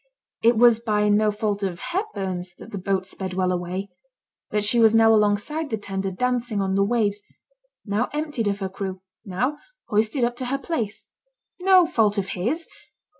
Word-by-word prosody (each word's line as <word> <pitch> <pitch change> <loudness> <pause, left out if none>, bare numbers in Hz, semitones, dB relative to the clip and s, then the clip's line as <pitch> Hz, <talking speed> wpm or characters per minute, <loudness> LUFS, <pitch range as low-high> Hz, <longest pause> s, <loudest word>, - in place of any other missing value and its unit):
It 230 0 +4
was 235 -1 +6
by 210 -2 +1
no 210 +1 +4
fault 210 -1 -1
of 190 -3 -2
Hepburn's 190 - -4
that - - -12
the 200 - -4
boat 190 0 -1
sped 190 -1 -4
well 185 -1 +1
away; 180 +2 -3 0.6
that 210 -1 0
she 235 +3 +2
was 225 -1 +6
now 225 0 +6
alongside 210 +9 +1
the 220 - -1
tender, 195 -2 -3
dancing 245 +2 -1
on 190 -1 0
the 195 +1 +3
waves; 210 -2 0 0.6
now 210 +3 0
emptied 295 -7 -2
of 200 0 -1
her 190 - -2
crew; 190 -1 -6 0.2
now 250 +9 -2 0.3
hoisted 220 +5 +1
up 240 0 +1
to 255 - -4
her 270 +3 -1
place. 275 -8 -4 0.5
No 370 -1 +6
fault 220 -11 +2
of 195 -1 -1
his! 250 - -2
210 Hz, 175 wpm, -24 LUFS, 195-240 Hz, 0.6 s, was